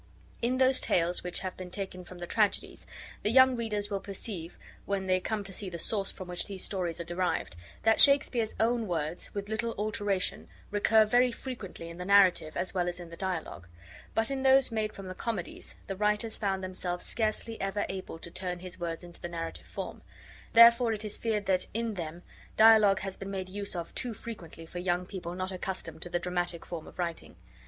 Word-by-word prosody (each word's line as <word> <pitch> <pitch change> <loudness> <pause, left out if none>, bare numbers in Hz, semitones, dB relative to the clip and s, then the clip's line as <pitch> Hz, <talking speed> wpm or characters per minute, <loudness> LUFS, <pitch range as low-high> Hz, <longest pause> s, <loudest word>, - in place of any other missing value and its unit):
In 245 +2 +1
those 260 0 +5
Tales 175 0 +2
which 180 0 -2
have 185 -1 -4
been 185 -1 -7
taken 185 -1 -5
from 180 0 -11
the 175 - -5
Tragedies, 210 +3 0 0.3
the 210 - +1
young 260 +2 +7
readers 210 -3 -2
will 200 - 0
perceive, 195 -3 -7 0.3
when 200 -1 0
they 185 0 +3
come 210 +2 -2
to 195 0 -5
see 195 0 -3
the 170 - -5
source 195 +3 0
from 185 - -9
which 180 0 -1
these 195 -2 -4
stories 175 -4 -2
are - - -2
derived, 175 - -1 0.3
that 225 0 +5
Shakespeare's 270 -5 +5
own 230 0 +2
words, 160 -1 -3
with 200 0 -3
little 230 +2 -2
alteration, 205 -2 -1 0.2
recur 215 +1 +5
very 245 +3 +4
frequently 230 -9 -7
in 170 +1 -9
the 180 - -4
narrative 190 -5 +5
as 185 - -1
well 175 -2 +1
as 175 0 -6
in 170 -1 -9
the - - -7
dialogue; 175 - -4 0.5
but 225 +3 +2
in 270 -1 -1
those 265 -1 +5
made 215 -1 0
from 195 - -9
the 185 - -5
Comedies 205 -2 -4
the 195 - -4
writers 210 +2 +1
found 195 -2 -1
themselves 180 -1 -3
scarcely 225 0 -1
ever 195 +1 -1
able 190 -3 -5
to 170 +1 -9
turn 180 -1 -3
his 185 0 -7
words 170 0 -3
into 175 -1 -11
the 175 - -4
narrative 165 -1 -5
form: - - -6 0.5
therefore 235 0 +8
it 215 0 -2
is 210 - 0
feared 215 -3 -1
that, 185 -1 +2
in 230 -1 -1
them, 170 -2 -6 0.3
dialogue 215 -3 +7
has 195 -1 -4
been 195 - -7
made 190 -1 -4
use 200 0 -5
of 170 -1 -5
too 245 -3 -2
frequently 170 -8 -8
for 175 +2 -7
young 175 0 0
people 180 -2 -6
not 185 +1 -2
accustomed 180 -4 -5
to 175 - -4
the 175 - 0
dramatic 175 -1 -1
form 165 -2 -6
of - - -13
writing. 170 -2 -4
195 Hz, 205 wpm, -30 LUFS, 175-220 Hz, 0.5 s, therefore